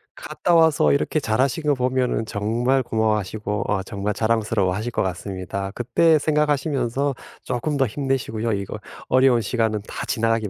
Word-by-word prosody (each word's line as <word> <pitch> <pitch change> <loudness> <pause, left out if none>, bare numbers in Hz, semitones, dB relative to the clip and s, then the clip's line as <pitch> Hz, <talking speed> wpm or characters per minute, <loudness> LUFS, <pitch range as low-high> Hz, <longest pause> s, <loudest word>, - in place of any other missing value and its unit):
갔다 175 - -2
와서 160 - +4
이렇게 75 - +1
잘하신 130 +5 0
거 150 -1 +3
보면은 125 -2 0
정말 115 +6 0
고마워하시고 110 -2 -1
어 95 -2 0
정말 100 0 -3
자랑스러워하실 110 -1 0
것 - - -1
같습니다. 95 +1 -4
그때 150 +8 +3
생각하시면서 145 -3 0 0.3
쪼끔 145 +5 -2
더 135 -3 +2
힘내시고요. 120 -3 -2
이거 100 -1 -4 0.3
어려운 130 -2 +4
시간은 110 -1 0
다 - - -5
지나가기 115 -2 0
115 Hz, 380 characters per minute, -22 LUFS, 105-135 Hz, 0.3 s, 와서